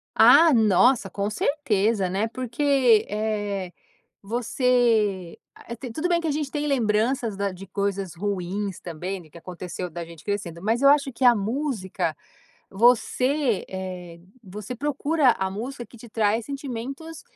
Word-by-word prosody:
Ah, 330 -2 +7
nossa, 225 0 +4
com 200 +1 -2
certeza, 215 -6 0
né, 195 +4 0
porque, 255 -1 +2
eh, 205 -3 -2 0.5
você 225 -4 +1 0.2
a 235 - -9
tem 250 +1 -8
tudo 315 +9 -2
bem 345 -1 +2
que 335 - -4
a - - +1
gente 295 -1 -2
tem 295 -1 -2
lembranças 230 -2 +1
da 200 0 -1
de 185 +2 -10
coisas 195 -1 -3
ruins 195 +1 -3
também 180 +3 -5
do 160 - -18
que - - -16
aconteceu 180 +1 -6
da 170 +1 -6
gente 165 -2 -14
crescendo. 190 -5 -4
Mas 225 +5 0
eu 275 - +7
acho 280 -2 +3
que 255 - -3
a 245 -1 +8
música, 215 - -2 0.6
você, 250 +3 +2
eh, 180 -2 -7 0.2
você 210 +3 -7
procura 290 +1 +2
a 190 0 -1
música 240 +5 -6
que - - -16
te 235 +1 -13
traz 220 +1 +1
sentimentos, 275 +3 -6
220 Hz, 150 wpm, -24 LUFS, 195-260 Hz, 0.6 s, a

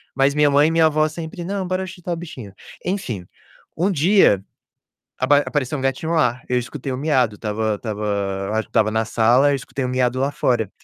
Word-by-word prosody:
mas 135 +1 +2
minha 150 -1 +4
mãe 145 +2 +5
e 160 - +1
minha 165 0 +4
avó 155 0 +3
sempre: 165 +2 -7
"Não, 190 0 -3
bora 185 +1 -1
ajudar 185 -2 -5
o - - -2
bichinho". 130 - -9 0.3
Enfim, 125 - -3 0.5
um 185 +5 +1
dia 165 - +4 0.8
apa 140 +3 +4
apareceu 145 -1 -2
um - - -5
gatinho 135 +5 -1
lá, 125 -7 +2
eu 125 - +1
escutei 130 +2 -4
o 130 - -3
miado, 130 -7 +1
estava 110 0 -2
estava, 100 -2 -3
acho 110 0 +1
que - - -37
estava 110 -1 +2
na 110 +1 +1
sala, 120 +5 +3
eu 140 - +1
escutei 135 0 -5
o - - -1
miado 125 0 0
lá 135 +1 +1
fora 120 -7 0
135 Hz, 205 wpm, -21 LUFS, 110-160 Hz, 0.8 s, mãe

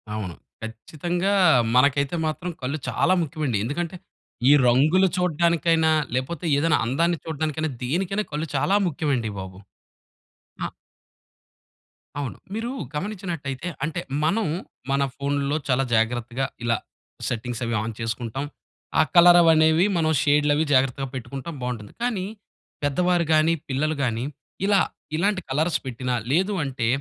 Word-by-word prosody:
అవును. 95 -6 -4 0.3
ఖచ్చితంగా 170 - -2 0.4
మనకైతే 140 +3 +3
మాత్రం 175 +3 -3
కళ్ళు 140 +4 -2
చాలా 185 - +2
ముఖ్యమండి. 150 -6 -1
ఎందుకంటే 170 +8 -3 0.5
ఈ - - +8 0.2
రంగులు 155 +10 +4
చూడడానికైనా 170 -2 +2 0.2
లేపోతే 135 +6 -3
ఏదైనా 160 +2 +3
అందాన్ని 165 +7 +1
చూడడానికైనా, 155 0 -2
దేనికైనా 190 +10 0
కళ్ళు 150 +2 -2
చాలా 185 +9 +2
ముఖ్యమండి 140 -8 -1
బాబు. 95 -1 -8 1.1
ఆ! - - -4 1.5
అవును. 140 -4 -4 0.2
మీరు 230 +3 -3 0.2
గమనించినట్టయితే 170 -6 -4 0.2
అంటే 165 +2 -2 0.2
మనం 195 +7 +2 0.5
మన 140 0 +2
ఫోనుల్లో 140 +1 -1
చాలా 135 0 +2
జాగ్రత్తగా 120 +3 0 0.2
ఇలా 115 -1 +2 0.5
సెట్టింగ్స్ 120 +1 -3
అవి 115 - -2
ఆన్ 110 +1 -4
చేసుకుంటాం. 115 +4 -3 0.5
ఆ - - +8
కలరవనేవి 165 -1 +7
మనం 160 -1 +2
షేడ్‌లవి 145 +1 +3
జాగ్రత్తగా 135 +1 +2
పెట్టుకుంటాం 135 +5 -6
బావుంటుంది. 120 -4 -5
కానీ 220 -7 -1 0.6
పెద్దవారు 175 +4 +2
గానీ, 155 +1 +4 0.2
పిల్లలు 150 +4 0
గానీ 120 -1 -1 0.4
ఇలా 200 -1 +4 0.4
ఇలాంటి 195 +3 +1
కలర్స్ 155 +5 +1
పెట్టినా 125 0 -3 0.2
లేదంటే 155 - 0
150 Hz, 115 wpm, -24 LUFS, 130-170 Hz, 1.5 s, ఈ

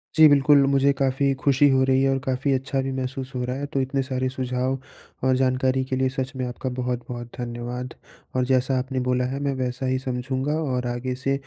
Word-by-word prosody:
जी 155 -1 +9
बिल्कुल, 145 0 +5
मुझे 140 +1 +4
काफ़ी 135 0 +1
खुशी 140 0 +5
हो 130 0 +4
रही 130 0 +3
है 135 - +3
और 135 - +2
काफ़ी 135 +2 0
अच्छा 135 +1 -1
भी 135 - -3
महसूस 130 +1 -4
हो 125 - -1
रहा 125 - -3
है। 145 - -3
तो 135 - +2
इतने 135 +1 -1
सारे 130 -1 -1
सुझाव 130 0 -1 0.5
और 130 - +4
जानकारी 130 0 +1
के 130 - -2
लिए 130 0 +1
सच 130 0 -3
में 130 -1 -2
आपका 125 +1 -4
बहुत-बहुत 120 -1 -4
धन्यवाद। 120 +1 -5 0.4
और 125 0 +2
जैसा 130 0 +2
आपने 130 0 -3
बोला 125 0 +2
है 140 - -3
मैं 140 -1 0
वैसा 125 +1 -3
ही 130 0 +1
समझूँगा 130 +2 -2
और 125 -4 -1
आगे 125 +1 -3
से 135 +2 -1
130 Hz, 215 wpm, -24 LUFS, 125-135 Hz, 0.5 s, जी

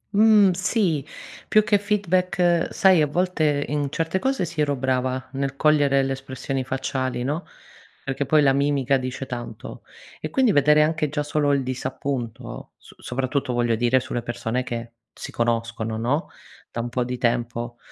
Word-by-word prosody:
Mhmm, 210 -3 +6
sì 185 - 0 0.4
più 215 - +4
che 205 -1 +3
feedback 185 -4 +1
sai 185 -4 +5
a 150 - +3
volte, 155 -3 0
in 145 -1 -1
certe 165 +4 -1
cose 265 -5 0
si, 160 -1 -3
ero 145 -1 +1
brava, 130 0 -1
nel 135 0 -2
cogliere 140 -2 +3
le 135 - -1
espressioni 135 0 -4
facciali 130 -1 -2
no, 150 +6 -3 0.6
perché 135 0 -3
poi 150 +1 +4
la 135 -1 +4
mimica 140 -1 +2
dice 130 +1 -4
tanto; 120 -2 -7 0.4
e - - -4
quindi 260 -5 +3
vedere 150 0 +5
anche 155 -1 0
già 150 0 -2
solo 145 -1 +1
il 140 -1 +1
disappunto, 130 -1 -5
so - - -18
soprattutto 130 +1 -2
voglio 120 -1 +1
dire 120 +3 +3
sulle 125 -1 -4
persone 120 +1 -2
che 120 -2 -6 0.2
si - - -8
conoscono 115 -1 -1
no, 130 +9 -1 0.4
da 115 - -4
un 120 - -4
po' 125 +1 -1
di 125 +1 -4
tempo 120 0 -1
135 Hz, 165 wpm, -23 LUFS, 125-155 Hz, 0.6 s, Mhmm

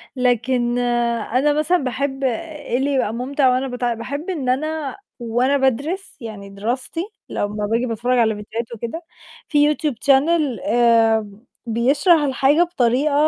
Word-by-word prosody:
لكن 245 -1 +1
أنا 240 +3 +1
مثلًا 305 +4 +2
باحب 270 -1 -3
إيه 290 +1 -2
اللي 275 +2 0
يبقى 250 -5 0
مُمتِع 260 +3 +1
وأنا 255 +2 +1
بت 250 0 -6
باحب 250 - -3
إن 285 -8 -2
أنا 300 +1 -2 0.2
وأنا 245 +4 +1
بادرس 280 +10 -1
يعني 210 -3 -8
دراستي 240 +11 -3 0.3
لمّا 205 0 -2
بآجي 230 +4 0
باتفرّج 245 +2 0
على 220 -2 +3
فيديوهات 225 +3 -6
وكده 235 +10 -6 0.4
في 295 -1 +3
يوتيوب 300 -3 0
channel 285 +7 +3 0.3
آمم، 225 -2 +2 0.2
بيشرح 275 - +3
الحاجة 280 +3 +3
بطريقة 280 -4 +1
255 Hz, 135 wpm, -20 LUFS, 230-285 Hz, 0.4 s, على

